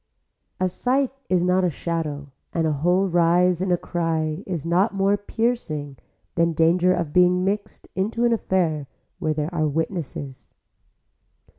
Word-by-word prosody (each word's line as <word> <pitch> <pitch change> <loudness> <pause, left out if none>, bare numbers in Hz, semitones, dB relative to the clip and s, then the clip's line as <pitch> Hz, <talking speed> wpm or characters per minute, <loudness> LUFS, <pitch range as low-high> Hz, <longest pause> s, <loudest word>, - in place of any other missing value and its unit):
A 185 - +2
sight 255 +8 0 0.2
is 180 -2 +2
not 180 +1 +2
a 180 - +3
shadow 150 -3 -4 0.2
and 165 -1 +1
a 155 - +2
whole 175 +7 +2
rise 175 0 +3
in 190 -1 0
a 175 - +3
cry 165 -1 -2
is 170 -6 -3
not 185 +5 +2
more 195 +1 +3
piercing 205 - -2 0.4
than 170 0 +2
danger 170 +3 +3
of 170 -5 -1
being 180 0 +4
mixed 200 +1 -3
into 220 +5 0
an 235 - +3
affair 170 -9 0 0.3
where 155 -1 0
there 155 +3 -2
are 155 -2 +1
witnesses. 150 -4 -4
175 Hz, 150 wpm, -23 LUFS, 160-190 Hz, 0.4 s, being